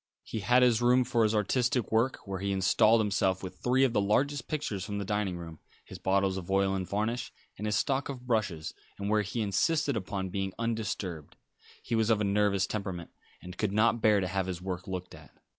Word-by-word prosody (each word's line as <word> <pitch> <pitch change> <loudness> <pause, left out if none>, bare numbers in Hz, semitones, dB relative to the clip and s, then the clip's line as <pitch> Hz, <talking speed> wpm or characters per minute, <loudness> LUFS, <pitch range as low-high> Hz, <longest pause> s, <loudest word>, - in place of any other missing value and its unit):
He 110 - -5
had 125 +5 +4
his 120 -2 +4
room 125 +1 +4
for 120 -1 0
his 110 0 +3
artistic 120 +3 +1
work, 115 +4 +2
where 95 -2 -4
he 100 +1 -1
installed 100 +4 +4
himself 95 -2 0
with 95 - -7
three 130 +2 +2
of 130 -3 +2
the 105 - +2
largest 135 +8 +1
pictures 140 - -3
from 100 +1 -4
the 100 - -3
dining 105 -3 -1
room, 80 -2 -9 0.3
his - - -10
bottles 95 0 +1
of 90 -1 -7
oil 95 0 +2
and 95 -2 -3
varnish, 110 +4 -2 0.2
and 105 - -4
his 105 - +1
stock 135 +1 0
of 125 -3 -7
brushes, 100 -10 -1 0.2
and 100 +1 -3
where 105 0 +3
he 105 +3 -3
insisted 140 - +1
upon 95 -2 -3
being 95 0 -3
undisturbed. 105 -8 -3 0.5
He - - -5
was 110 -1 +2
of 110 -2 +3
a - - 0
nervous 100 -1 +2
temperament, 95 -5 -5 0.3
and 90 0 -10
could 105 -2 0
not 115 +2 +3
bear 105 -2 +5
to 95 - -1
have 95 0 -1
his 90 -2 -4
work 90 +1 -5
looked 90 -1 -5
at. - - -13
105 Hz, 215 wpm, -29 LUFS, 95-115 Hz, 0.5 s, bear